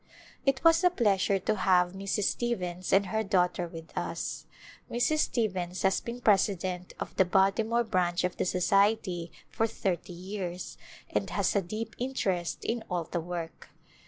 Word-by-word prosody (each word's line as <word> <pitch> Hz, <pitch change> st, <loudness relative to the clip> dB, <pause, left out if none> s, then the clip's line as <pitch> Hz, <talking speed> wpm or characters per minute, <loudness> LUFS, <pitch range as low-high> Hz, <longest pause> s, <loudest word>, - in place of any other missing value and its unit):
It 270 Hz, -1 st, +2 dB
was 330 Hz, +1 st, +6 dB
a 360 Hz, -, +7 dB
pleasure 200 Hz, -, +2 dB
to 210 Hz, +3 st, -1 dB
have 180 Hz, -2 st, +3 dB
Mrs. 195 Hz, +1 st, -2 dB
Stevens 185 Hz, -6 st, -1 dB
and 195 Hz, +1 st, +5 dB
her 220 Hz, +4 st, -1 dB
daughter 180 Hz, -3 st, +1 dB
with 165 Hz, -1 st, -11 dB
us. -, -, -4 dB, 0.4 s
Mrs. 245 Hz, +6 st, +1 dB
Stevens 185 Hz, -, -1 dB
has 190 Hz, 0 st, +3 dB
been 240 Hz, +1 st, -6 dB
president 185 Hz, -4 st, +1 dB
of -, -, -5 dB
the -, -, +6 dB
Baltimore 195 Hz, +6 st, +2 dB
Branch 180 Hz, -5 st, 0 dB
of 180 Hz, 0 st, -1 dB
the -, -, 0 dB
Society 185 Hz, -2 st, +2 dB, 0.2 s
for 225 Hz, -, +1 dB
thirty 185 Hz, -5 st, -2 dB
years 180 Hz, 0 st, -5 dB, 0.4 s
and -, -, -1 dB
has -, -, 0 dB
a 200 Hz, -, +4 dB
deep 215 Hz, +6 st, -5 dB
interest 195 Hz, -9 st, -2 dB
in 230 Hz, 0 st, -1 dB
all 175 Hz, -2 st, -1 dB
the 170 Hz, +1 st, -3 dB
work. 170 Hz, -1 st, -6 dB
190 Hz, 160 wpm, -29 LUFS, 180-220 Hz, 0.4 s, a